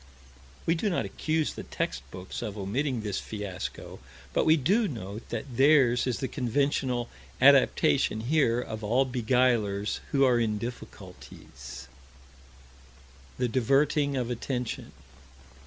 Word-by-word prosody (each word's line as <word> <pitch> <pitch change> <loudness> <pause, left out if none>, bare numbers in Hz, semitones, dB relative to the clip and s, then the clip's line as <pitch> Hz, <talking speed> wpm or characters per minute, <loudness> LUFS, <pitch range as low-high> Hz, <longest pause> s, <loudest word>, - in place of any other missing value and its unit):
We 165 - +3
do 175 +5 0
not 175 - -1
accuse 155 -1 -1
the - - -7
text 60 - -3
books 90 +4 -7
of 105 0 -5
omitting 120 +6 -1
this 105 -2 -2
fiasco, 100 -4 -6 0.3
but - - +1
we 160 +1 +6
do 200 - +2
note 110 - -7
that 130 -4 -5
theirs 135 -4 +4
is 125 - 0
the 130 - -2
conventional 130 -1 0 0.3
adaptation 110 - +4
here 125 -2 +2
of 110 -3 -6
all 120 +6 +2
beguilers 120 -5 +1
who 140 -1 +2
are 125 -2 +3
in 110 -2 0
difficulties 70 - -9 1.5
The 125 - +1
diverting 140 +4 +2
of 125 -1 -2
attention. 125 0 -4
120 Hz, 125 wpm, -28 LUFS, 105-140 Hz, 1.5 s, we